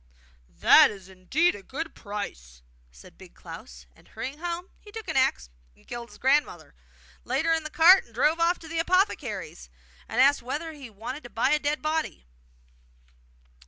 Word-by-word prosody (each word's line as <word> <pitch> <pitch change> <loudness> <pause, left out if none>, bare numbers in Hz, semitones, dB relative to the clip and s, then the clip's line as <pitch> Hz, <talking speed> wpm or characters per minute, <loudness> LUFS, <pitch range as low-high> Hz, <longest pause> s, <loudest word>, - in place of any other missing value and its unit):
'That - - +6
is 195 -3 -10
indeed 190 - +1
a 205 - -10
good 315 +10 -6
price!' 65 - -8 0.3
said - - -17
Big - - -15
Klaus; - - -11
and, - - -22
hurrying 260 +7 -7
home, 345 +2 -5
he 415 - -15
took 445 0 -8
an - - -3
axe 260 - +1 0.2
and - - -25
killed 240 -1 -7
his 210 - -15
grandmother, 265 - 0 0.5
laid 310 - -1
her 330 - +3
in 325 -1 -1
the 310 - -6
cart, 345 +5 +7
and 230 - -22
drove 300 +7 +2
off 340 +1 +2
to 325 - -13
the 330 0 -3
apothecary's, 365 +4 -1 0.4
and 225 - -2
asked 280 +1 +5
whether 295 +7 -4
he 280 -5 -11
wanted 225 +7 -7
to 240 - -11
buy 240 +4 +1
a 300 - +3
dead 295 +1 -2
body. 310 - -2
275 Hz, 180 wpm, -26 LUFS, 210-325 Hz, 0.5 s, cart